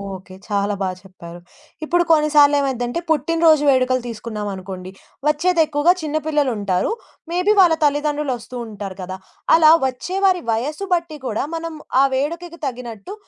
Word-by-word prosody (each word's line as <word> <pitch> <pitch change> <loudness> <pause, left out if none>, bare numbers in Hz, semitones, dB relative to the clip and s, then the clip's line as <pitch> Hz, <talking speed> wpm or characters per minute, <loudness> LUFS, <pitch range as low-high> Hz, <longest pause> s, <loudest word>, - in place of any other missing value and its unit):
Okay. 185 0 -12
చాలా 205 0 0
బా 190 - 0
చెప్పారు. 175 -2 -12 0.4
ఇప్పుడు 345 +2 +2
కొన్నిసార్లు 300 -2 +5
ఏమైద్దంటే 255 +1 -1
పుట్టినరోజు 320 0 +3
వేడుకలు 255 -1 +2
తీసుకున్నాం 215 -2 -5
అనుకోండి. 185 -1 -8 0.4
వచ్చేది 325 +3 +2
ఎక్కువగా 300 +4 +3
చిన్న 310 0 -2
పిల్లలుంటారు. 235 - 0 0.4
మేబీ 360 +4 +2
వాళ్ళ 350 -3 +6
తల్లిదండ్రులొస్తూ 290 -5 -1
ఉంటారు 200 -3 -7
కదా! 185 +1 -6 0.4
అలా 315 -1 +7 0.2
వచ్చే 310 +9 -5
వారి 370 -2 +3
వయసు 300 - -2
బట్టి 335 -3 -1
కూడా 225 -1 -1
మనం 330 0 -5 0.3
ఆ - - +6
వేడుకకి 335 +5 -3
తగినట్టు 240 - -6
285 Hz, 135 wpm, -20 LUFS, 215-320 Hz, 0.4 s, అలా